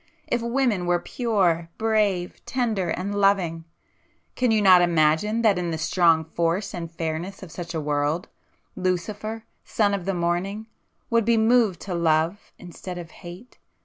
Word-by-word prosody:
if 240 Hz, -, -1 dB
women 235 Hz, -6 st, 0 dB
were 175 Hz, 0 st, +3 dB
pure, 175 Hz, -6 st, 0 dB
brave, 210 Hz, -5 st, 0 dB
tender 225 Hz, -7 st, -1 dB
and 195 Hz, +3 st, -2 dB
loving,—can 190 Hz, +4 st, -2 dB
you 220 Hz, -1 st, +3 dB
not 185 Hz, -3 st, +7 dB
imagine 175 Hz, +6 st, +2 dB
that 205 Hz, -5 st, +4 dB
in 175 Hz, -1 st, -2 dB
the 160 Hz, -, -2 dB
strong 160 Hz, 0 st, +3 dB
force 170 Hz, +5 st, -1 dB
and 170 Hz, -2 st, -6 dB
fairness 170 Hz, +4 st, -4 dB
of 175 Hz, -, -10 dB
such 170 Hz, 0 st, -7 dB
a -, -, 0 dB
world, 150 Hz, +3 st, -1 dB, 0.5 s
'Lucifer, 205 Hz, +5 st, -3 dB, 0.2 s
son 205 Hz, -2 st, +1 dB
of 195 Hz, -3 st, -3 dB
the 195 Hz, -1 st, -1 dB
Morning' 175 Hz, +5 st, -1 dB, 0.5 s
would 230 Hz, 0 st, +3 dB
be 230 Hz, +1 st, +3 dB
moved 220 Hz, -4 st, +3 dB
to 190 Hz, -, -5 dB
love 165 Hz, +3 st, 0 dB
instead 180 Hz, +1 st, -8 dB
of 170 Hz, -2 st, -8 dB
hate? 180 Hz, +8 st, -12 dB
180 Hz, 150 wpm, -24 LUFS, 170-215 Hz, 0.5 s, not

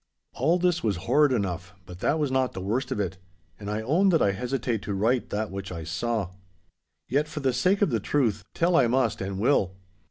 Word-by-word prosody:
All 160 Hz, +8 st, +2 dB
this 180 Hz, -1 st, +1 dB
was 105 Hz, -3 st, +1 dB
horrid 145 Hz, +5 st, +4 dB
enough, 95 Hz, -4 st, -2 dB
but 90 Hz, 0 st, -10 dB
that 150 Hz, -, +1 dB
was 150 Hz, -4 st, 0 dB
not 130 Hz, -1 st, +1 dB
the -, -, -5 dB
worst 105 Hz, +8 st, -2 dB
of -, -, -1 dB
it, 95 Hz, -2 st, -2 dB, 0.4 s
and 100 Hz, -1 st, -6 dB
I 105 Hz, +1 st, -2 dB
own 170 Hz, -, +3 dB
that 165 Hz, -3 st, +4 dB
I 100 Hz, -, +3 dB
hesitate 120 Hz, +1 st, -2 dB
to 100 Hz, -, -3 dB
write 115 Hz, +5 st, +1 dB
that 105 Hz, 0 st, -2 dB
which 95 Hz, -1 st, -6 dB
I 85 Hz, -2 st, -5 dB
saw. 90 Hz, +4 st, -2 dB, 0.8 s
Yet, 145 Hz, +3 st, +1 dB
for 150 Hz, -1 st, -6 dB
the 130 Hz, -2 st, +1 dB
sake 185 Hz, -, +2 dB
of 170 Hz, -, +2 dB
the 115 Hz, -, +1 dB
truth, 110 Hz, -4 st, 0 dB
tell 170 Hz, +1 st, +2 dB
I 130 Hz, -7 st, +5 dB
must 125 Hz, -2 st, +1 dB
and 95 Hz, 0 st, -3 dB
will. 100 Hz, -4 st, +2 dB
115 Hz, 220 wpm, -26 LUFS, 100-140 Hz, 0.8 s, I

